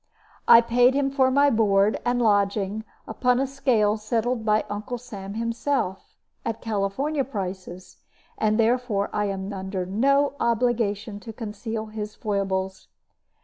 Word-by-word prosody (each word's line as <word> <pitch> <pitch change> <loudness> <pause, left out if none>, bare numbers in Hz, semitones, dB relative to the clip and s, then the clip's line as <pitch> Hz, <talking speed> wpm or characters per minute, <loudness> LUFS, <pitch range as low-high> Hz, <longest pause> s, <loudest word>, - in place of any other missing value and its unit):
I 230 - +9
paid 245 +2 +3
him 275 -1 +1
for 265 -1 +3
my 280 +2 +4
board 205 -2 +3
and 245 0 +1
lodging, 205 -1 +1 0.2
upon 250 +2 +1
a 270 - +1
scale 240 -6 +1
settled 225 +2 -1
by 215 0 +2
Uncle 210 +4 -4
Sam 205 -5 -8
himself, 230 -3 -2 0.3
at 225 - -3
California 225 +8 -1
prices; 185 -6 -6 0.4
therefore 220 -1 +1
I 210 - 0
am 195 0 -4
under 190 -1 -4
no 275 +9 +2
obligation 225 -3 0
to 225 +2 -9
conceal 220 0 -5
his 215 -1 -6
foibles. 190 -2 -2
220 Hz, 130 wpm, -24 LUFS, 200-245 Hz, 0.4 s, I